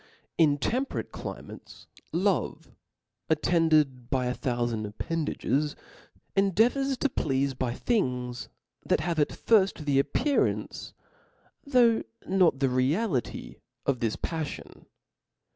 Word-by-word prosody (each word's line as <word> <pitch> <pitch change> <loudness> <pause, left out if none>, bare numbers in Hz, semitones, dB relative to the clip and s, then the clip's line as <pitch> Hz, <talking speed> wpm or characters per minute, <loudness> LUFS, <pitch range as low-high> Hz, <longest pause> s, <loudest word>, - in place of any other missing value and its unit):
In 150 -4 +4
temperate 255 - -2
climates, - - -9 0.3
love - - 0 0.6
attended 155 -6 +2
by 130 -2 +1
a 125 - 0
thoufand 120 -5 -2
appendages, 150 +4 -1 0.6
endeavours 235 +8 +2
to 285 - +1
pleafe 135 - -1
by 125 -2 -2
things 125 - -1 0.3
that - - +1
have 165 0 -1
at 150 - +3
firft 195 -8 +2
the 140 -2 +3
appearance, 285 - 0 0.7
though 245 -5 +4 0.3
not 180 -7 +3
the. 135 - +3
reality 130 - -1 0.3
of 135 -3 +1
this 115 -2 0
paf 160 -3 -3
fion - - -10
150 Hz, 110 wpm, -28 LUFS, 130-195 Hz, 0.7 s, In